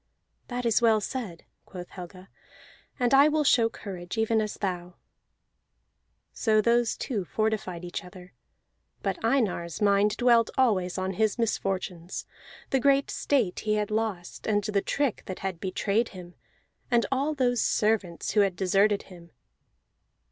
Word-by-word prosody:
"That 245 -1 -4
is 230 0 +3
well 225 -2 +4
said," 210 -6 -5 0.2
quoth 180 -2 -9
Helga, 185 +1 -10 0.7
"and 245 0 +2
I 280 +2 +7
will 305 0 +2
show 235 -5 +4
courage, 190 -3 -7
even 225 0 +2
as 215 -1 -3
thou." 180 -2 -4 1.4
So 220 -2 +2
those 235 +1 +2
two 220 -8 -2
fortified 195 -3 -2
each 175 +2 -5
other; 180 0 -13 0.7
but 195 0 -2
Einar's 215 -9 0
mind 205 +1 +3
dwelt 235 -2 +4
always 195 -9 +2
on 185 0 -1
his 215 +2 +1
misfortunes: 190 -6 -2 0.5
the 270 - +3
great 275 +1 +3
state 240 -11 0
he 215 0 0
had 210 0 -1
lost, 215 -5 -3
and 205 -1 +2
the 200 -1 0
trick 280 0 -1
that 185 - -5
had 185 -3 -3
betrayed 200 +4 0
him, 180 -2 -11 0.6
and 240 -2 +3
all 280 +3 0
those 245 -3 +1
servants 210 -6 0
who 215 - +2
had 195 -3 +1
deserted 200 +3 +2
him. 175 -2 -14
210 Hz, 145 wpm, -27 LUFS, 185-235 Hz, 1.4 s, I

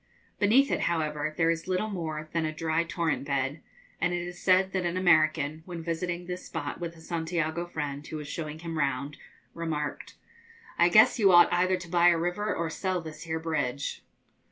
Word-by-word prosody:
Beneath 250 +7 +4
it, - - +1
however, 155 -2 -1
there 165 0 +3
is 165 +1 -4
little 185 +4 -1
more 155 -4 -4
than 165 -1 +1
a 155 - -1
dry 160 +1 0
torrent 165 -2 -1
bed; 140 +1 -1 0.4
and 175 0 +1
it 175 - -2
is 175 0 -7
said 185 0 +3
that 190 -1 0
an 175 +1 -1
American, 155 -3 +3
when 170 -2 -6
visiting 175 +1 -3
this 180 +1 -5
spot 145 0 -5
with 170 -1 -5
a - - -15
Santiago 165 0 -2
friend, 145 -3 -5
who 155 - -5
was 150 -1 -7
showing 155 -1 -5
him 165 -1 -5
round, 140 0 -1 0.4
remarked, 155 -3 -4 0.6
'I 170 +1 +6
guess 215 +6 +6
you 200 -3 +6
ought 175 0 +7
either 185 +1 +2
to 175 -1 -9
buy 175 0 +4
a 175 -1 +5
river 175 +5 -1
or 170 - -1
sell 185 +3 -2
this 160 -1 -9
here 160 -1 -2
bridge.' 145 -4 -2
165 Hz, 195 wpm, -28 LUFS, 155-175 Hz, 0.6 s, ought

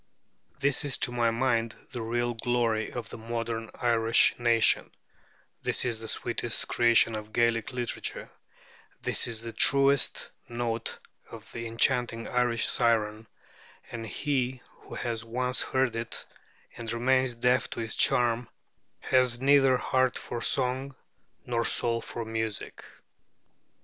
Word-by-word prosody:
This 140 +2 +1
is 140 -3 -3
to 140 -4 +2
my 120 -1 +2
mind 115 -1 0 0.2
the 120 - -5
real 120 +1 -1
glory 115 -2 0
of 115 -2 -6
the - - -8
modern 115 0 -4
Irish 115 -1 +3
nation; 115 -1 +3 0.7
this - - -1
is 115 -3 -1
the 110 - -8
sweetest 120 +1 -1
creation 115 -1 +4
of 110 0 -7
Gaelic 115 -1 +1
literature; 125 -2 -4 0.7
this - - +1
is 115 -1 -3
the 115 -1 -6
truest 140 +3 +3 0.2
note 120 -1 -3 0.3
of - - -11
the 115 0 -5
enchanting 115 0 +1
Irish 120 -2 +1
siren, 110 -1 +1 0.6
and 115 -1 -6
he 130 0 -2
who - - -12
has 115 -2 -3
once 125 +2 0
heard 130 -3 0
it 115 0 -4 0.5
and 115 -1 -5
remains 130 +1 +2
deaf 125 +2 +2
to - - -5
its 110 -1 -4
charm 120 -1 +2 0.5
has 125 -2 +2
neither 135 -1 +5
heart 130 0 +1
for 120 - -5
song 130 +2 0 0.5
nor 120 -1 0
soul 115 0 +1
for 115 0 -6
music. 110 -1 -3
120 Hz, 135 wpm, -28 LUFS, 115-125 Hz, 0.7 s, neither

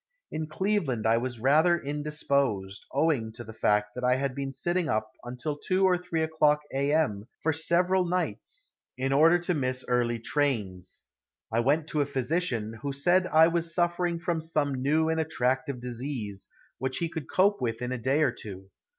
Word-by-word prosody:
In 155 0 -3
Cleveland 155 - -1
I 115 +1 +4
was 120 0 -3
rather 155 +8 +4
indisposed, 140 - -2
owing 140 -6 +1
to 120 - -7
the 110 - -10
fact 105 -1 +1
that 125 - -6
I 125 0 +4
had 135 0 -1
been 135 0 -4
sitting 175 +3 -1
up 110 -3 -1
until 125 +5 -4
2 190 +4 +1
or 185 -1 +4
3 175 -2 -2
o'clock 150 -2 +2
a. 140 +1 +1
m. 115 -10 +1 0.2
for 160 - +2
several 180 +4 +2
nights 170 - -1 0.2
in 135 +1 0
order 160 +5 +6
to 175 +1 -1
miss 130 -4 -2
early 120 -1 +1
trains. 110 -9 -2 0.5
I 115 - +1
went 145 +6 +2
to 150 - 0
a 140 - 0
physician, 130 -5 -2
who 140 - -2
said 175 +7 +2
I 160 -1 +6
was 170 0 -1
suffering 175 0 +1
from 170 -1 -2
some 150 -3 0
new 155 +4 +2
and 160 0 0
attractive 135 -2 -1
disease, 120 -5 -5 0.3
which 130 +1 -2
he 170 - -1
could 160 -3 -6
cope 200 +2 +3
with 115 -2 -1
in 125 0 -3
a 130 - -2
day 135 +6 +2
or 135 - +3
two. 95 -4 -10
140 Hz, 185 wpm, -28 LUFS, 120-160 Hz, 0.5 s, order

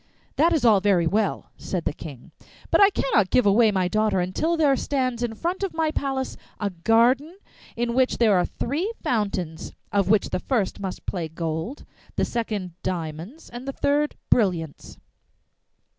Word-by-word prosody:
'That 330 +4 +4
is 315 -7 +1
all 215 -4 +6
very 190 -4 +2
well,' 205 +5 -1
said 180 -3 -4
the - - 0
King, 140 -6 -10 0.4
'but - - +5
I 400 - +8
cannot 220 - +1
give 250 - +3
away 215 +3 +5
my 190 -2 +1
daughter 215 -1 +1
until 250 - 0
there 290 -4 +4
stands 255 -3 -1
in 235 -2 -2
front 350 - -3
of 390 -4 -3
my 320 -1 +1
palace 270 -3 -2 0.2
a 205 -2 -1
garden 235 - +2 0.4
in 235 0 -1
which 260 +1 +2
there 220 -4 +4
are 180 - +2
three 320 - -2
fountains, 200 - -2 0.2
of 200 -2 +1
which 210 -1 +3
the - - 0
first 220 -2 -1
must 190 -2 -6
play 175 -4 -3
gold, 160 - -4 0.3
the - - +1
second 210 -6 -3
diamonds, 175 - -5
and 245 +2 -8
the 275 - -3
third 295 +2 +1 0.2
brilliants. 175 -9 0
220 Hz, 170 wpm, -24 LUFS, 185-270 Hz, 0.4 s, I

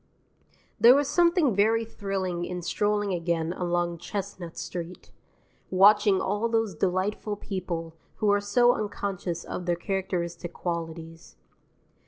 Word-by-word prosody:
There 240 +3 +8
was 285 0 +2
something 340 - +3
very 225 +3 +3
thrilling 190 -5 -3
in 180 0 -5
strolling 205 +1 0
again 170 -1 -1
along 175 -1 -1
Chestnut 185 -3 -6
Street, 175 0 -7 0.6
watching 200 +1 +5
all 205 +4 -1
those 225 -3 0
delightful 190 +5 -1
people 180 -5 -5 0.2
who 210 -1 +2
are 205 0 +2
so 240 +4 +4
unconscious 200 -4 -3
of 180 - -6
their 175 - +2
characteristic 175 -2 -3
qualities. 165 -1 -6
190 Hz, 120 wpm, -27 LUFS, 175-210 Hz, 0.6 s, There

